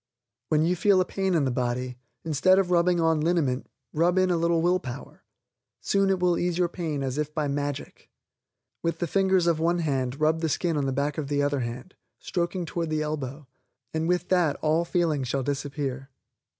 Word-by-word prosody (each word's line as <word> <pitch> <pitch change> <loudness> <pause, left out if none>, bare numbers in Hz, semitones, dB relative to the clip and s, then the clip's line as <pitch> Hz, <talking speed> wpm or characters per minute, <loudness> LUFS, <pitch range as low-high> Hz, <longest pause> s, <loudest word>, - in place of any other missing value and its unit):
When 155 0 +3
you 180 +2 +2
feel 195 +2 +4
a 185 - +3
pain 190 -1 -1
in 150 -4 +2
the 130 - 0
body, 125 0 -2 0.3
instead 165 +5 +4
of 190 -2 +1
rubbing 175 0 +3
on 160 -2 +2
liniment, 150 -6 0 0.2
rub 175 +4 +2
in 185 -1 +3
a - - +3
little 170 0 +2
will 180 +1 +3
power; 130 -3 -9 0.6
soon 195 -1 +1
it 190 -1 +1
will 180 -1 +2
ease 175 -1 0
your 180 -1 +2
pain 160 -5 -3
as 135 +2 -2
if 150 0 -2
by 155 -2 0
magic. 145 0 -4 0.7
With 170 -1 -1
the 175 - -1
fingers 190 +1 +2
of 170 -2 +2
one 170 +2 +2
hand 135 -5 -1
rub 155 +1 +2
the 160 - 0
skin 170 +2 0
on 140 -2 0
the - - 0
back 140 +3 -1
of 145 - -3
the 145 0 0
other 145 -1 0
hand, 125 +8 -5 0.2
stroking 175 0 -2
toward 165 0 -3
the 155 -1 0
elbow, 145 -1 -4 0.5
and 160 +1 -1
will 180 +1 +3
that 175 -5 +3
all 160 +2 +2
feeling 165 -5 0
shall 130 +2 -1
disappear. 140 -1 -3
160 Hz, 205 wpm, -26 LUFS, 140-175 Hz, 0.7 s, feel